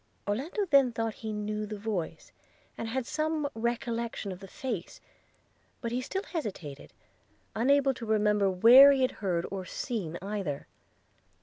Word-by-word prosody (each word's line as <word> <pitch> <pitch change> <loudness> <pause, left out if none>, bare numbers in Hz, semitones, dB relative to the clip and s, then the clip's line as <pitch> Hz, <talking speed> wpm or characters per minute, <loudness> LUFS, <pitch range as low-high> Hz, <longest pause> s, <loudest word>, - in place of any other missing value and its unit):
Orlando 280 - -1
then 275 -7 +5
thought 225 -1 -2
he 220 0 -6
knew 210 0 -3
the 210 0 -5
voice, 195 -7 -4 0.4
and 225 - -5
had 250 +2 -2
some 310 +1 -1
recollection 235 -2 -2
of 180 - -7
the 195 - -10
face; 240 - -5 0.8
but 235 -2 -4
he 245 +2 -1
still 380 +9 -3
hesitated, 185 - -6 0.6
unable 275 +3 +3
to 235 -3 -8
remember 210 -2 +3
where 240 +9 +9
he 270 -2 +2
had 255 - +2
heard 175 -4 0
or 195 -1 -4
seen 185 -4 -4
either. 195 -7 -4
225 Hz, 145 wpm, -29 LUFS, 200-260 Hz, 0.8 s, where